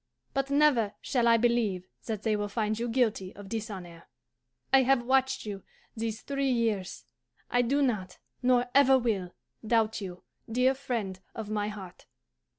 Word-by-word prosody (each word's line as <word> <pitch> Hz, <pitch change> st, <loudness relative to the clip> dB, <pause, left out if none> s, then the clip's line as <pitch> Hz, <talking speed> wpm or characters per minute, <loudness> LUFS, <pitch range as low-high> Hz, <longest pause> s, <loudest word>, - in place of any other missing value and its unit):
But 275 Hz, 0 st, -1 dB
never 280 Hz, -8 st, +3 dB
shall 240 Hz, -3 st, +1 dB
I 230 Hz, 0 st, +6 dB
believe 220 Hz, -6 st, +1 dB, 0.2 s
that 215 Hz, -3 st, -3 dB
they 220 Hz, -1 st, +2 dB
will 205 Hz, 0 st, -1 dB
find 215 Hz, +1 st, -1 dB
you 240 Hz, +1 st, -2 dB
guilty 225 Hz, -6 st, 0 dB
of 205 Hz, 0 st, -10 dB
dishonour. 190 Hz, -7 st, -6 dB, 0.7 s
I 270 Hz, -, +8 dB
have 260 Hz, -1 st, +3 dB
watched 265 Hz, 0 st, +2 dB
you 200 Hz, -2 st, -5 dB, 0.3 s
these 225 Hz, -1 st, -3 dB
three 275 Hz, -1 st, -1 dB
years; 225 Hz, -6 st, -1 dB, 0.5 s
I 245 Hz, -, +4 dB
do 275 Hz, +4 st, +2 dB
not, 200 Hz, -8 st, -1 dB, 0.2 s
nor 250 Hz, -1 st, +3 dB
ever 270 Hz, -1 st, +6 dB
will, 205 Hz, -8 st, -1 dB, 0.3 s
doubt 220 Hz, -1 st, +1 dB
you, 180 Hz, -2 st, -7 dB, 0.3 s
dear 250 Hz, +3 st, +3 dB
friend 230 Hz, -8 st, -3 dB, 0.2 s
of 215 Hz, -2 st, -5 dB
my 210 Hz, -1 st, 0 dB
heart. 195 Hz, -4 st, -9 dB
225 Hz, 155 wpm, -29 LUFS, 205-255 Hz, 0.7 s, I